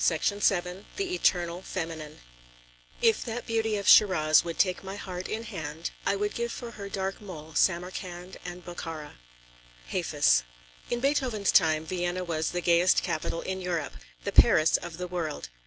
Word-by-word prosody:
CHAPTER 180 +5 +1
VI 180 -1 +1
THE 385 -2 -2
ETERNAL 175 - +1
FEMININE 165 -5 -6 0.8
If 225 -2 +4
that 240 0 -5
beauty 225 -2 0
of 200 - -4
Shiraz 155 -7 +6
would 170 -1 -5
take 185 -1 +1
my 195 +1 -6
heart 185 -2 -6
in 220 +1 -3
hand, 160 -6 -5 0.2
I - - +3
would 205 +1 -1
give 235 0 -2
for 240 -2 -6
her 200 -3 -8
dark 195 0 -3
mole 160 -6 -9
Samarkand 180 +1 -1
and 180 0 -8
Bokhara. 165 - -7 0.7
HAFIZ. - - +3 0.5
In 240 - -1
Beethoven's 255 -7 +1
time, 155 -1 +4
Vienna 175 +1 -2
was 160 -2 -1
the 175 - -2
gayest 175 +1 +4
capital 160 +1 -2
in 190 0 -4
Europe, 175 - -2 0.3
the - - -2
Paris 155 +1 +6
of 165 - -8
the 180 0 -4
world. 165 - -4
180 Hz, 160 wpm, -28 LUFS, 165-200 Hz, 0.8 s, Shiraz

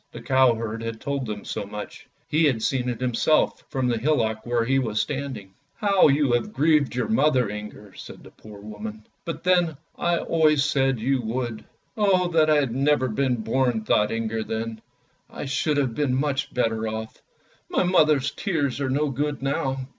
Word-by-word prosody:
The - - -7
cow 130 -2 +4
herd 115 0 -4
had 115 -1 -5
told 140 -3 -3
them 105 -1 -6
so - - -4
much; 105 +1 -8 0.2
ho 155 - +2
had 135 -9 +2
seen 125 -2 0
it 120 - -4
himself 125 +5 +1
from 130 -3 -1
the 120 -2 0
hillock 110 -5 0
where 120 -1 +1
he 135 +2 +2
was 110 -4 -1
standing. 130 -7 -4
" - - -45
How 200 -4 +4
you 140 -2 +2
have 120 - 0
grieved 150 -3 +2
your 125 - -1
mother, 150 - +2
Inger," 105 -1 -9
said - - -11
the - - -14
poor 105 -2 -13
woman. 105 +1 -8
" - - -46
But 165 - -5
then 175 -4 +2 0.2
I 175 0 +1
always 155 -4 +2
said 135 -4 +1
you 130 +3 0
would! 120 0 -4 0.2
" - - -42
"Oh, 190 -4 +3
that 160 -2 +3
I 155 - +5
had 140 -6 +1
never 135 0 +2
been 125 0 0
born!" 125 -2 0
thought 105 -1 +2
Inger 115 0 -2
then. 110 0 -4 0.3
" - - -41
I - - -7
should 145 +2 0
have 135 -5 0
been 140 -1 0
much 140 0 -1
better 110 -2 0
off. 110 0 -6 0.5
My - - +1
mother's 155 -6 +3
tears 145 - -2
are 135 - -1
no 145 +2 0
good 145 +1 -2
now." 135 -1 -2
130 Hz, 200 wpm, -24 LUFS, 115-150 Hz, 0.5 s, I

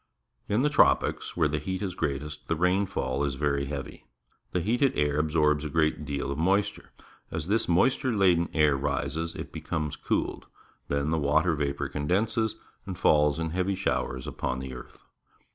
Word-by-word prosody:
In 110 +5 +2
the 150 - +3
tropics, - - +2
where 80 -3 +4
the 75 +1 -1
heat 95 +6 -3
is 95 -3 -2
greatest, 75 -1 -4
the 80 - +1
rainfall 90 -3 0
is 70 -2 -1
very 70 0 0
heavy. 70 -1 -7 0.4
The 90 - -1
heated 120 +8 +1
air 75 0 +1
absorbs 75 -1 +2
a 75 - -3
great 75 0 +1
deal 70 -1 -3
of 70 - -3
moisture. 95 +5 +1 0.4
As 80 0 -4
this 110 -1 +1
moisture 130 +9 +3
laden 90 -5 +3
air 75 -3 +3
rises, 70 +4 -2
it - - -7
becomes 75 -2 -3
cooled. - - -2 0.4
Then 70 +2 0
the 80 - +1
water 80 +4 +2
vapour 70 -2 -1
condenses 105 +10 0 0.3
and 95 -2 -5
falls 75 -4 +4
in 80 -1 -2
heavy 95 +3 0
showers 65 -8 -2
upon 65 - -3
the 65 0 -6
earth. 60 - -11
75 Hz, 170 wpm, -28 LUFS, 70-90 Hz, 0.4 s, where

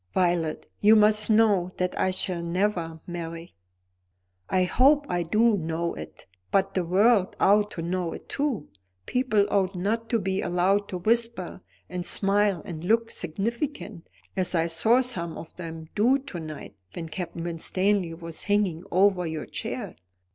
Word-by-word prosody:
"Violet, 175 -4 +1
you 215 +2 +6
must 215 0 +4
know 210 -5 +4
that 180 0 -1
I 190 - +1
shall 185 -1 -1
never 170 -2 -1
marry." 170 -1 -7 1.0
"I 185 - +3
hope 280 +10 +4
I 175 -5 -1
do 215 +7 +3
know 165 -1 -2
it. 80 0 -10 0.3
But 195 - +2
the 185 - 0
world 195 +3 +3
ought 205 +1 +4
to 165 - -5
know 175 0 -2
it - - -10
too. 275 - -2 0.4
People 245 -5 +2
ought 195 -1 +1
not 220 +5 -1
to 235 - +2
be 190 -2 -1
allowed 185 +3 +1
to 185 - -3
whisper, 230 -2 0 0.3
and 180 0 -4
smile, 195 -1 +1
and 160 -2 -7
look 225 +4 +2
significant; 205 - -4 0.3
as 185 -1 0
I 165 -1 +2
saw 220 +10 +3
some 175 -10 -2
of 165 - -10
them 165 -2 -7
do 240 +6 +4
to 270 -10 -8
night 155 -2 -8 0.2
when 165 -1 -5
Captain 170 0 -5
Winstanley 175 +1 0
was 165 -1 -7
hanging 195 -5 +1
over 185 -1 +3
your 160 -1 -4
chair. - - -5
185 Hz, 155 wpm, -26 LUFS, 170-210 Hz, 1.0 s, you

